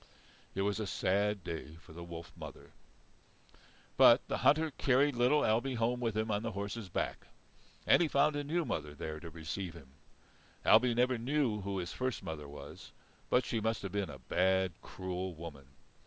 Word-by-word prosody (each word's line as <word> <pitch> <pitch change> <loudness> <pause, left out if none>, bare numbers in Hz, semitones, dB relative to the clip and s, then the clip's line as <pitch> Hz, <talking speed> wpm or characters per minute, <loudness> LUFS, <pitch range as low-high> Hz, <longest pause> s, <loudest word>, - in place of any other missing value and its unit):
It 95 - 0
was 100 +1 0
a 110 - -2
sad 100 +1 0
day 80 -3 -6
for 80 -1 -15
the 85 +1 -8
wolf 85 -2 -9
mother. - - -10 1.3
But - - +7
the - - -2
hunter 155 +1 +4
carried 135 +1 +2
little 125 +5 +4
Ailbe 120 +4 +1
home 120 +2 +1
with 115 -3 -1
him 110 0 0
on 105 0 0
the 115 -1 -3
horse's 100 +1 -4
back. - - -3 0.6
And - - +6
he 170 - +3
found 145 +1 +3
a 145 - -1
new 165 +3 0
mother 75 - -3
there 75 +1 -5
to 85 +1 -8
receive 80 +2 -5
him. 70 -6 -13 0.8
Ailbe 115 +2 +6
never 125 0 +2
knew 125 -4 0
who 100 0 -3
his 90 -2 -4
first 130 -1 -2
mother 75 -3 -6
was, 70 +1 -10 0.4
but 125 0 +3
she 115 - -1
must 110 0 -1
have 100 - -4
been 100 -3 -1
a - - -8
bad, 95 +7 +1
cruel 95 -1 -5
woman. 75 -4 -9
100 Hz, 185 wpm, -33 LUFS, 85-125 Hz, 1.3 s, But